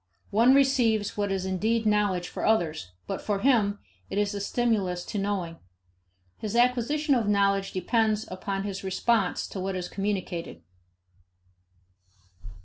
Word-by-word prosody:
one 235 +6 +5
receives 245 -6 +2
what 205 -1 -1
is 190 -1 -1
indeed 220 +5 0
knowledge 205 -4 +1
for - - -6
others, 160 - 0
but - - -4
for 205 -1 -1
him 215 -6 +3 0.3
it - - -4
is 205 0 +1
a 200 - -4
stimulus 200 -5 0
to 210 - -3
knowing. 190 -5 -2 0.8
His 215 0 -4
acquisition 250 +5 +2
of 235 -5 +1
knowledge 200 -1 +2
depends 215 +3 +1
upon 195 +1 -3
his 200 -1 -5
response 195 +1 +1
to 195 - -6
what 190 +1 -2
is 180 -1 -3
communicated. 185 - -4
205 Hz, 140 wpm, -27 LUFS, 190-225 Hz, 0.8 s, one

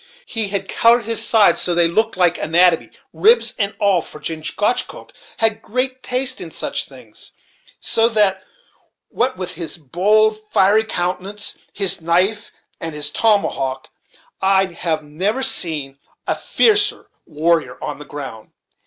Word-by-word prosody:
He 225 - -2
had 200 0 -3
colored 235 0 +3
his 230 -1 +1
sides 220 -3 +4
so 175 - 0
that 175 - +3
they - - +4
looked 220 +4 0
like 175 -2 +2
anatomy, 170 +1 +2 0.2
ribs 455 +4 +3
and 200 -1 -1
all, 200 -5 +2
for 150 - -11
Chingachgook 160 +9 -2 0.2
had 225 -1 +3
a - - -14
great 255 +3 -3
taste 255 +1 -2
in 175 - -7
such - - -4
things, 125 -6 -14 0.5
so 225 +1 +1
that, 205 -4 +1 0.7
what 255 +2 -1
with 185 -1 -5
his 170 0 -6
bold, 210 +9 +2
fiery 205 +3 +3
countenance, 190 +1 -3 0.2
his 195 -4 +3
knife, 185 +6 +1 0.3
and 165 -2 -5
his 150 0 -1
tomahawk, 150 -12 0 0.5
I 195 0 +3
have 160 -2 -2
never 190 - -2
seen 150 - -1 0.3
a - - 0
fiercer 415 -2 +1 0.2
warrior 165 +1 0
on - - -6
the - - -8
ground. 135 -7 -9
190 Hz, 145 wpm, -19 LUFS, 165-220 Hz, 0.7 s, sides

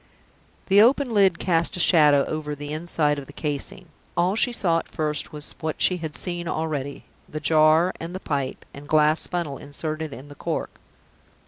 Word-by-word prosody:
The 200 +1 +5
open 250 +2 +3
lid 195 -5 +4
cast 170 -1 0
a - - -5
shadow 150 -5 +5
over 150 -1 -4
the 145 +1 -6
inside 155 -2 0
of 135 - -10
the - - -11
casing. 150 +4 -5 0.3
All 180 +3 +2
she 245 +3 +3
saw 170 -8 +1
at - - -10
first 150 -1 -2
was 150 -1 -6
what 155 -1 -4
she 180 - +3
had 160 -3 -5
seen 175 -2 -3
already 150 -4 -3 0.2
the 155 - -5
jar, 155 +3 +4
and 170 +2 -6
the - - -4
pipe 140 -6 -3
and 145 +1 -11
glass 155 +1 +3
funnel 170 -6 -3
inserted 155 +2 -4
in 130 +4 -10
the 145 - -11
cork. - - -4
155 Hz, 185 wpm, -24 LUFS, 145-175 Hz, 0.3 s, The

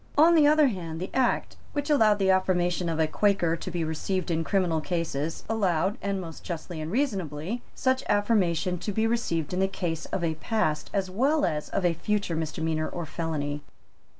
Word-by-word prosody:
On 325 +3 +7
the 310 -3 +6
other 305 0 +6
hand 165 -6 -5
the 185 - -5
Act 260 -2 +1 0.2
which 290 +1 -1
allowed 220 -8 +5
the 190 -1 +3
affirmation 180 -2 +1
of 160 -1 -2
a 160 - +4
Quaker 175 -1 +2
to 170 - -6
be 170 -2 -2
received 170 +3 -2
in 165 0 +1
criminal 175 -3 +1
cases 165 -3 -2
allowed, 195 -3 +1
and 200 -1 -1
most 165 -3 -8
justly 170 -1 -5
and 155 +2 -4
reasonably, 195 - -1
such 260 0 +1
affirmation 185 -4 +2
to 210 - -3
be 220 +3 +1
received 185 -9 -1
in 180 - 0
the 190 - +3
case 170 -4 -3
of 180 - -3
a 165 -1 +1
past 160 -2 -1
as 190 -2 -1
well 280 +9 +2
as 150 -1 -2
of 195 - -1
a 175 - +3
future 200 +1 -1
misdemeanour 160 0 -2
or 170 -2 -5
felony. 150 -2 -3
180 Hz, 190 wpm, -27 LUFS, 160-210 Hz, 0.2 s, On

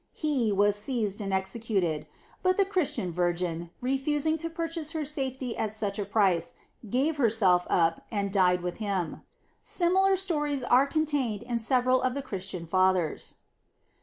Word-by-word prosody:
He 275 -8 0
was 205 +1 +3
seized 215 -2 -1
and 195 -1 -3
executed; 190 -4 -1 0.3
but 370 0 +2
the 395 - +4
Christian 360 - -1
virgin, 175 -1 -1
refusing 285 +4 +1
to 330 +1 -3
purchase 330 -1 -3
her 315 -2 -2
safety 265 -4 -3
at 215 - -2
such 210 -2 -2
a 205 - -1
price, 190 -5 +1 0.3
gave 280 +7 +1
herself 210 -8 +3
up, 165 -1 +2
and 200 -3 -2
died 180 -2 +3
with 180 0 -4
him. 195 -6 -2 0.4
Similar 380 +2 +2
stories 295 -8 -1
are 255 +3 +4
contained 280 -8 -1
in 240 -1 -2
several 255 +2 +2
of 255 0 0
the 280 - -3
Christian 190 -7 -5
fathers. 185 -1 +1
230 Hz, 150 wpm, -28 LUFS, 190-290 Hz, 0.4 s, the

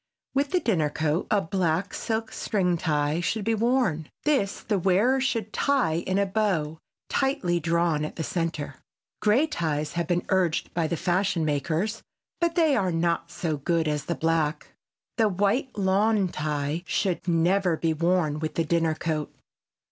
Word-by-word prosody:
With 280 +1 +1
the 365 - +2
dinner 170 - +1
coat 155 +3 -1
a 205 - +3
black 180 +1 -1
silk 220 -1 -2
string 190 -5 0
tie 150 -2 0
should 200 +4 -1
be 225 - +2
worn; 225 - +1
this 270 -10 +1
the 205 -2 0
wearer 205 +9 +3
should 230 -5 -1
tie 270 - +1
in 185 +3 -1
a 200 - +3
bow, 190 -7 -1 0.3
tightly 265 - 0
drawn 165 -1 +1
at 155 - -5
the 160 - -3
center. 165 -6 -3 0.4
Gray 220 +8 +4
ties 155 - -2
have 170 -2 -1
been 175 0 0
urged 185 -4 +1
by 165 -2 0
the 170 - -2
fashion 180 -2 +1
makers, 160 +9 -1 0.4
but 340 -1 +1
they 320 -5 +4
are 185 -2 +1
not 170 0 0
so 160 -4 -2
good 165 +3 0
as 150 -1 -1
the 170 - -2
black. 160 -2 -1 0.4
The 220 -2 +4
white 205 +7 0
lawn 200 +1 +2
tie 150 0 -2
should 185 -2 -1
never 175 +1 +2
be 165 0 0
worn 165 -2 +1
with 155 0 -4
the 165 - +1
dinner 165 -1 +1
coat. 155 -2 -2
175 Hz, 165 wpm, -26 LUFS, 160-210 Hz, 0.4 s, Gray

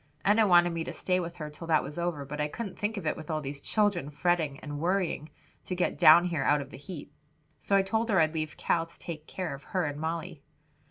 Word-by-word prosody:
Enna 210 +2 +5
wanted 175 -1 +6
me 165 -1 -2
to - - -5
stay 185 -1 0
with 170 -1 -5
her 150 -2 -6
till 165 +3 -9
that 160 -2 +3
was 150 +4 -6
over, 170 -5 -2
but 150 +2 -4
I 150 - +1
couldn't 200 +6 -6
think 210 +1 -1
of 195 - -5
it - - +1
with 155 0 -10
all 155 -1 0
these 140 -1 -6
children 205 -9 +1
fretting 155 -2 0
and 145 -1 -6
worrying 175 -2 0 0.4
to 180 - -3
get 180 - 0
down 170 +3 +8
here 170 -5 -1
out 145 +1 +3
of 140 -1 -7
the - - -9
heat. 145 +3 -9 0.5
So 195 - +1
I 195 - +5
told 220 +4 0
her 195 -4 +4
I'd 155 -1 +3
leave 155 -1 -3
Cal 165 -1 +1
to 165 - -16
take 160 -2 -7
care 185 -5 -4
of 140 - -9
her 185 -2 -1
and 145 0 -4
Molly. 165 0 -4
165 Hz, 255 wpm, -29 LUFS, 150-180 Hz, 0.5 s, down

